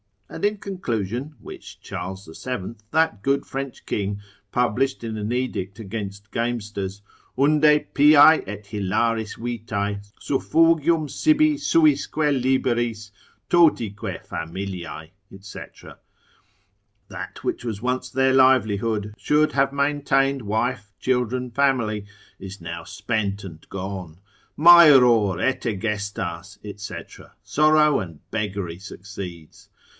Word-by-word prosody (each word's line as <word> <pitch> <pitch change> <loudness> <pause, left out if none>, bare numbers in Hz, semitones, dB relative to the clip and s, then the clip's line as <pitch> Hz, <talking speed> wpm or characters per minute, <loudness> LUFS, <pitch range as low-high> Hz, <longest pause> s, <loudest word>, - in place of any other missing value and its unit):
And - - -4
in 210 +1 +1
conclusion 130 - -4
(which - - -11
Charles 95 +2 -6
the 80 - -12
Seventh, 115 -2 -6
that 160 -10 +1
good 140 +3 0
French 135 -1 -6
king, 100 0 -2 0.3
published 125 +2 0
in 110 -1 -4
an 105 +1 -3
edict 115 -6 -3
against 100 -2 -7
gamesters) 105 -4 -3 0.4
unde 150 +2 +3
piae 150 +2 +7
et 105 +1 -7
hilaris 110 +2 -1
vitae, 110 -4 -3 0.2
suffugium 165 +2 +2
sibi 310 - +3
suisque 155 - +2
liberis, 125 -6 0 0.4
totique 120 - +2
familiae, 85 -2 -6 0.3
&c. 100 - -9 1.5
That - - -8
which - - -3
was 110 -3 -4
once 125 +1 -2
their 130 0 +2
livelihood, 110 -5 +2
should 150 +1 +2
have 135 0 +1
maintained 140 -2 +1
wife, 105 -1 -2
children, 125 0 -1
family, 115 -6 +1 0.3
is 95 0 -9
now 85 0 -6
spent 100 -2 -2
and 80 -5 -11
gone; 95 -4 -6 0.4
maeror 130 - +7
et 130 0 0
egestas, 100 -4 -3 0.2
&c., 100 - -8 0.2
sorrow 150 -1 +4
and 85 -7 -8
beggary 100 -5 -3
succeeds. 95 -4 -10
115 Hz, 110 wpm, -23 LUFS, 100-135 Hz, 1.5 s, piae